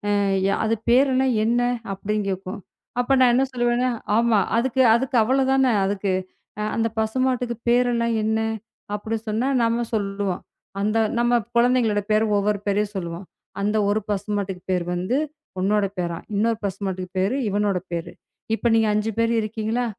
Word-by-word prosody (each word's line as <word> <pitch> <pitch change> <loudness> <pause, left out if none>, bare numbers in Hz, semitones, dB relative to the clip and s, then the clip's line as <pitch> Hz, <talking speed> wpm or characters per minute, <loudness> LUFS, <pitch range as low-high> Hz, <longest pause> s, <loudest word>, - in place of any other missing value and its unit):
ஆ, - - +2 0.5
அது 225 +1 +2
பேருலாம் 260 +1 +4
என்ன?" 240 +2 +2 0.3
அப்படின்னு 205 +2 -2
கேக்கும். 190 +1 -4 0.4
அப்ப 245 +2 +1
நான் 250 -2 +5
என்ன 265 - +3
சொல்லுவேன்? 240 0 +1 0.3
"ஆமா, 230 -2 +3 0.2
அதுக்கு 260 +2 +1
அதுக்கு 255 +2 -1
அவ்ளோதானே." 265 0 +3
அதுக்கு 195 -1 -1 0.6
அந்த 230 0 +1
பசுமாட்டுக்கு 250 +1 0
பேருலாம் 235 -1 +2
என்ன? 220 +1 +1 0.5
அப்படின்னு 220 +2 -3
சொன்னா, 225 +5 0
நாம 230 +1 +1
சொல்லுவோம். 195 -3 -2 0.4
அந்த 215 +2 +1 0.2
நம்ம 240 0 +3 0.2
குழந்தைகளோட 235 -3 +3
பேரை 215 +1 +3
ஒவ்வொரு 205 0 +1
பேரையா 205 +1 +1
சொல்லுவோம். 170 0 -5 0.4
"அந்த 210 +2 +1
ஒரு 210 +1 +2
பசுமாட்டுக்கு 200 -2 -2
பேரு 180 -2 0
வந்து 185 +9 0 0.4
உன்னோட 205 +1 +2
பேரா. 170 -1 -2 0.2
இன்னொரு 225 +2 +1
பசுமாட்டுக்கு 190 -2 -4
பேரு 195 +8 +1
இவனோட 205 -1 +1
பேரு. 170 -1 -4 0.4
இப்ப 235 - 0
நீங்க 225 -1 +3
5 210 +1 0
பேர் 230 0 +2
இருக்கீங்களா?" 220 +3 -2
220 Hz, 140 wpm, -23 LUFS, 200-240 Hz, 0.6 s, நான்